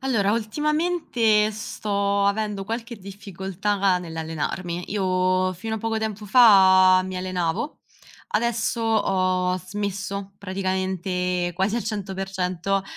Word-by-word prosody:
Allora, 225 -7 +1
ultimamente 240 -3 +1
sto 200 -1 -1
avendo 205 -1 -1
qualche 230 +3 -5
difficoltà 195 0 -2
nell'allenarmi. 170 +1 -4
Io 185 -1 +1
fino 220 +5 -4
a - - -5
poco 225 +1 -2
tempo 215 -1 -4
fa 190 -5 +7
mi 185 0 -5
allenavo, 180 - -2 0.5
adesso 235 +1 0
ho 185 -4 +1
smesso, 200 +1 -5
praticamente 185 -2 -2
quasi 195 +5 0
al 235 - -2
100% 195 -2 -2
195 Hz, 100 wpm, -24 LUFS, 185-215 Hz, 0.5 s, fa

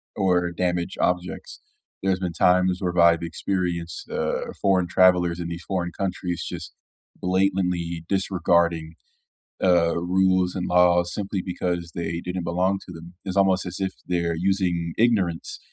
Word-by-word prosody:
or 90 -2 +1
damage 90 0 -1
objects. 90 0 -2 0.4
There's 95 -1 +1
been 90 -2 -3
times 90 +1 +3
where 90 -1 -1
I've 85 0 +5
experienced, 85 -1 -3
uh, 80 0 -2
foreign 95 -2 +3
travelers 90 -1 +3
in 85 - -3
these 85 0 -6
foreign 90 -3 -2
countries 90 -2 -3
just 85 -4 -6 0.5
blatantly 90 -3 0
disregarding, 85 -4 +1 0.7
uh, 85 -2 +3
rules 95 +1 +2
and 90 -2 -2
laws 90 -1 +4
simply 100 -2 -3
because 90 -2 -3
they 85 0 -3
didn't 90 -1 -4
belong 90 +3 +1
to 90 - -9
them, 85 +2 -11
it's 95 0 -4
almost 95 -1 +3
as 90 +2 -5
if 95 -1 -2
they're 85 -2 0
using 90 -2 0
ignorance 100 -8 +1
90 Hz, 140 wpm, -24 LUFS, 85-95 Hz, 0.7 s, I've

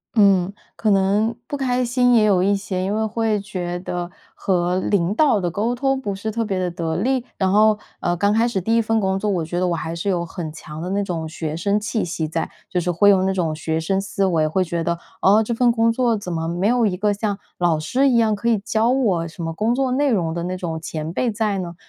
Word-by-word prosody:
嗯， 195 -3 +4 0.2
可 215 - 0
能 205 +4 +2
不 285 - -3
开 250 -2 0
心 245 0 +3
也 220 - +5
有 195 -4 +3
一 200 +2 +3
些。 190 -2 -3
因 200 +2 -1
为 220 0 0
会 220 -1 0
觉 180 -4 -4
得 175 -1 -4 0.3
和 180 -1 0
领 190 -1 +1
导 275 -5 +3
的 175 -2 -1
沟 220 +6 -1
通 270 +1 0
不 200 -4 -3
是 220 +3 -4
特 230 +1 -1
别 195 -3 -2
的 180 -1 -1
得 165 -2 -3
力， 255 +4 0
然 190 -1 +1
后 215 +1 +4 0.2
呃 175 0 0
刚 205 +3 +2
开 230 +2 +3
始 200 -5 -1
第 225 +5 +1
1 230 - +4
份 225 0 +1
工 190 -1 0
作， 210 - -1
我 175 -5 0
觉 175 +2 -3
得 180 - +1
我 170 - 0
还 165 +1 -4
是 185 +4 -2
有 175 -2 0
很 165 -2 -6
强 155 0 -9
的 180 - -4
那 200 +1 0
种 165 -4 -3
学 160 -1 -4
生 200 +5 +1
气 215 +1 -2
息 165 -2 -3
在。 165 +1 -3 0.2
就 180 - 0
是 180 - -2
会 205 +5 +4
用 190 -1 +3
那 190 - +1
种 165 -4 -1
学 160 0 -2
生 190 +4 0
思 195 0 -1
维， 160 -4 +2
会 185 +4 +1
觉 170 -1 -2
得 170 0 -1 0.2
哦 210 +3 +5
这 235 - -2
份 240 +1 +3
工 230 0 +2
作 235 -2 +1
怎 185 -3 -6
么 165 0 -2
没 175 +4 0
有 240 -1 +3
一 185 -3 0
个 205 +1 +1
像 205 -1 -2 0.2
老 170 -3 +2
师 255 - +1
一 240 - +3
样 220 -2 +3
可 235 +4 -1
以 225 - +3
教 220 +3 +1
我 200 -11 +1
什 165 +1 -8
么 165 0 -3
工 225 +7 0
作 265 -1 0
内 280 +2 +2
容 170 -6 0
的 170 0 -3
那 180 +1 -3
种 165 -3 -4
前 155 0 -5
辈 245 - 0
在 210 -2 -1
呢。 175 -2 -5
195 Hz, 275 characters per minute, -21 LUFS, 175-220 Hz, 0.3 s, 也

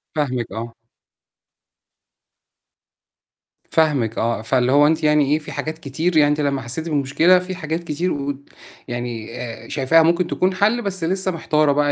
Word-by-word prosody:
فاهمِك 130 -7 -2
آه. 115 +3 -6 3.0
فاهمِك 140 -9 +1
آه، 115 -1 0
فاللي 125 +2 +1
هو 145 +1 +5
أنتِ 160 0 0
يعني 150 -2 +3
إيه 155 - +2
في 155 - -10
حاجات 155 0 -4
كتير 160 +3 -1
يعني 145 -1 +5
أنت 150 +1 0
لمّا 140 -2 0
حسيتِ 145 +8 -5
بالمشكلة 155 +5 +3
في 185 +1 -6
حاجات 165 -1 -4
كتير 170 +3 -2
و 140 0 -3 0.5
يعني 120 -2 -5
آآ، 115 -2 -8
شايفاها 160 +4 +3
ممكن 170 +2 +2
تكون 185 +2 0
حَلّ 215 +6 +1
بس 190 -4 -3
لسه 190 +2 0
محتارة 155 -3 +1
بقى 145 0 +2
150 Hz, 155 wpm, -20 LUFS, 130-165 Hz, 3.0 s, هو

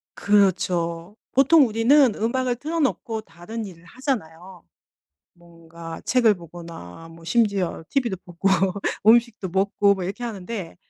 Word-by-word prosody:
그렇죠. 185 -3 +1 0.2
보통 275 +2 +5
우리는 235 +3 +4
음악을 245 +2 -1
틀어 315 +6 -3
놓고 235 -6 -1
다른 215 +5 -8
일을 175 -4 -12
하잖아요. 185 - -5 0.7
뭔가 165 -1 -11
책을 235 -4 +3
보거나 165 - -11
뭐 165 0 -15
심지어 200 -3 0
TV도 240 -8 -1
보고 180 +2 -1 0.6
음식도 225 -4 +3
먹고 200 +2 +2
뭐 190 - -5
이렇게 195 +7 -5
하는데 200 -4 -6
200 Hz, 280 characters per minute, -23 LUFS, 170-235 Hz, 0.7 s, 보통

